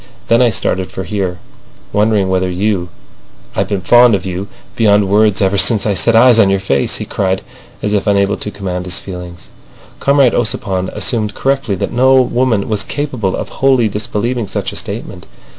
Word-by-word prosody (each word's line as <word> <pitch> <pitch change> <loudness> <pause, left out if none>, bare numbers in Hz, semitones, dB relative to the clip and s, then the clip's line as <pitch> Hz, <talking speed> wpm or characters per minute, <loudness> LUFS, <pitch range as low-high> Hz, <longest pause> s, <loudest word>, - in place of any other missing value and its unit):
Then 115 +1 +4
I 125 - +4
started 95 -2 -1
for 95 - -6
here, 95 -1 -3 0.6
wondering 105 -2 +2
whether 95 0 0
you—I've 90 -1 -5
been 100 -2 -2
fond 120 +4 +5
of 95 - -4
you 95 +2 -4 0.3
beyond 105 -3 +3
words 105 0 +2
ever 95 +1 +1
since 105 +4 +4
I 105 - +1
set 115 +4 +2
eyes 120 0 +6
on 100 -3 +5
your 95 0 +1
face," 70 -8 0
he - - -5
cried, 95 -1 -2 0.4
as 105 - -1
if 100 -1 0
unable 100 0 +2
to - - -5
command 95 -3 -5
his 90 0 -2
feelings. 90 -2 -9 0.5
Comrade 140 -3 +3
Ossipon 95 -5 -1
assumed 110 -4 -1
correctly 135 -6 -1
that 95 - -4
no 130 +2 +4
woman 125 -4 +1
was 105 -2 -1
capable 125 -11 -3
of - - -5
wholly 130 -4 +2
disbelieving 105 +3 -3
such 95 - -4
a - - -9
statement. - - -7
105 Hz, 175 wpm, -15 LUFS, 95-115 Hz, 0.6 s, eyes